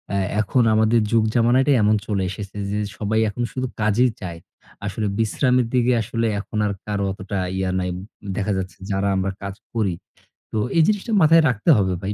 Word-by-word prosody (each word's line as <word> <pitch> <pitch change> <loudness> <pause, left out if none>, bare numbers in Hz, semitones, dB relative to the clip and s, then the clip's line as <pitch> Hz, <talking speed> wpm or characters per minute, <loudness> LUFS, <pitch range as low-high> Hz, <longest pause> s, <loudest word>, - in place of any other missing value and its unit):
এ - - +1 0.2
এখন 120 +4 +2
আমাদের 110 +2 +3
যুগ-জামানাটাই 120 +5 +3
এমন 105 +1 +4
চলে 100 -3 0
এসেছে 100 +1 -7 0.2
যে 105 - -1 0.2
সবাই 110 +1 0
এখন 120 +4 -3
শুধু 130 0 -3
কাজেই 110 +4 +3
চায়। 85 -3 -6 0.5
আসলে 105 +1 -2
বিশ্রামের 125 +3 +2
দিকে 125 0 +3
আসলে 115 +2 -1
এখন 105 - -6
আর 105 - 0
কারো 100 -1 -2
অতটা 100 0 -4 0.2
ইয়ে 95 -1 -1
নাই, 90 0 -2 0.5
দেখা 105 0 -1
যাচ্ছে 95 -3 -5
যারা 95 +1 0
আমরা 95 0 0
কাজ 100 0 -5 0.2
করি। 105 -6 0 0.6
তো - - -2 0.2
এই 165 - +6
জিনিসটা 215 +2 0
মাথায় 165 +1 +6
রাখতে 105 -4 -1
হবে 95 -3 +1
ভাই। 100 +1 -2
105 Hz, 180 wpm, -22 LUFS, 100-120 Hz, 0.6 s, এই